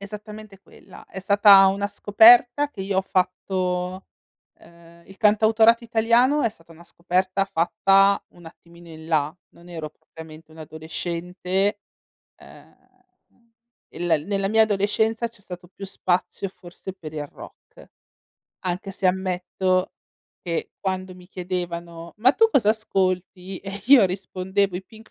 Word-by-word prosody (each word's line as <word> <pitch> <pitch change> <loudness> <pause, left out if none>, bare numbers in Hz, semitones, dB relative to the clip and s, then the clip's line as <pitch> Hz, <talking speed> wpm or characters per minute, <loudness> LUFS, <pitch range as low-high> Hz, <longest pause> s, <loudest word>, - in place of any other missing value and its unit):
Esattamente 210 0 -10
quella. - - -17
È 190 - -9
stata 200 0 +6
una 200 +1 0
scoperta 240 +7 +5
che 205 - -10
io 190 0 -1
ho - - +1
fatto 185 -1 -2 0.5
ehm, 170 0 -19
il 195 - -15
cantautorato 220 +2 +3
italiano 235 +5 +2
è - - +2
stata 165 -5 -17
una 165 +1 -16
scoperta 185 +3 -1
fatta 195 +2 +2
un 175 - -17
attimino 170 +1 -16
in 160 -1 -12
là, 155 -2 0 0.2
non 170 +1 -17
ero 160 -3 -7
propriamente 160 0 -14
un'adolescente. 175 +5 -3 0.6
Ehm, - - -17 1.2
il 165 -4 -1
nella 195 -1 -1
mia 220 +2 +4
adolescenza 220 +2 0
c'è 230 -2 -18
stato 180 -1 -10
più 195 +2 -11
spazio 185 +1 -2
forse 185 0 -11
per 160 -5 -10
il 150 -1 -5
rock, - - -15 0.8
anche 185 +2 -4
se 190 - -2
ammetto 185 0 -1 0.5
che 170 -2 -3
quando 185 -1 -4
mi 180 -1 -16
chiedevano: 175 -2 -6
"Ma 245 +4 +5
tu 450 +8 +3
cosa 240 - +2
ascolti?" 185 -3 -2
E 195 0 -8
io 260 -4 +7
rispondevo: 190 +1 -2
"I 185 - -7
Pink 220 +2 -17
190 Hz, 135 wpm, -23 LUFS, 175-205 Hz, 1.2 s, io